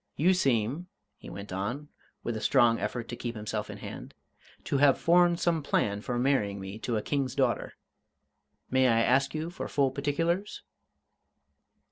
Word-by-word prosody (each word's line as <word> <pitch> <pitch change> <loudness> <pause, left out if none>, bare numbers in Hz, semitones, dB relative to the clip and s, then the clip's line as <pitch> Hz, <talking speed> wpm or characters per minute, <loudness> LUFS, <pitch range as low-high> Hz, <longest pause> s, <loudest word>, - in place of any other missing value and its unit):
You 180 +5 +4
seem," 135 - 0 0.3
he - - -10
went 100 -1 -8
on, 120 +10 -4 0.3
with 120 - -2
a 110 - -4
strong 115 -1 +4
effort 115 +3 -3
to - - -4
keep 120 -1 -5
himself 105 0 -4
in - - -7
hand, - - -9 0.5
"to 140 - 0
have 140 -1 +5
formed 175 0 +4
some 165 -2 +1
plan 105 -7 0
for 120 +2 -3
marrying 120 -6 +1
me 95 +2 -7
to 115 0 -2
a 105 - -3
King's 135 -3 -1
daughter. 130 -4 0 1.0
May 130 0 +4
I 115 -1 +3
ask 135 +5 +2
you 160 +2 -3
for 175 - -5
full 140 -2 +1
particulars?" 165 +8 -1
130 Hz, 165 wpm, -29 LUFS, 115-145 Hz, 1.0 s, have